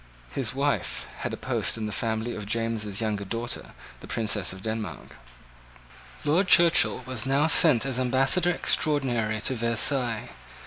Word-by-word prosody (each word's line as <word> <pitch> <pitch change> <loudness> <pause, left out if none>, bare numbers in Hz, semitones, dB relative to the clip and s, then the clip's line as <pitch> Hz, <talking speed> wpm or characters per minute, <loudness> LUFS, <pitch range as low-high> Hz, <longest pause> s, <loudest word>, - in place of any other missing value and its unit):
His 130 -2 -3
wife 140 0 -1
had - - -4
a - - -5
post - - -1
in 110 - -4
the 105 - -4
family 110 +3 -2
of 105 -1 -7
James's 110 -2 -2
younger 105 -2 -2
daughter, 115 +4 -4 0.3
the - - -12
Princess 105 -4 -1
of 95 +1 -10
Denmark. 110 -1 -5 1.1
Lord 170 +6 +2
Churchill 170 -7 +5
was 130 -2 -4
now 140 +3 +2
sent 155 -6 +5
as 130 -2 -2
ambassador 135 +8 +2
extraordinary 125 -10 0
to 130 - 0
Versailles. 115 0 +1
120 Hz, 145 wpm, -26 LUFS, 110-135 Hz, 1.1 s, Churchill